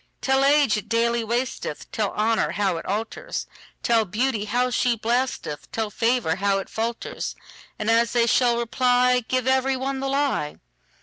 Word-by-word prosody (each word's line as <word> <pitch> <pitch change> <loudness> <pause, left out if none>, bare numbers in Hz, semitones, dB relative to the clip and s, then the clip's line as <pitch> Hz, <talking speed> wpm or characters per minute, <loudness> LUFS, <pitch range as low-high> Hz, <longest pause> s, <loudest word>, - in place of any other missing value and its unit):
Tell 265 0 +2
age 285 -5 +4
it 210 +1 -7
daily 235 0 +1
wasteth; 235 - -3
Tell 210 -3 -1
honour 220 +1 +1
how 195 -4 0
it - - -7
alters; 220 - -3 0.4
Tell 230 -1 +3
beauty 215 +2 -1
how 245 +4 0
she 245 0 +2
blasteth; 235 - -2
Tell 220 -2 -2
favour 230 -7 +1
how 200 0 +1
it 195 - -5
falters:And 225 -1 -5
as 230 +1 +3
they 240 -1 +3
shall 240 0 +3
reply, 250 +1 +2
Give 255 -1 0
every 265 0 +2
one 270 +1 -3
the 270 0 -2
lie. 275 - 0
235 Hz, 160 wpm, -24 LUFS, 215-255 Hz, 0.4 s, age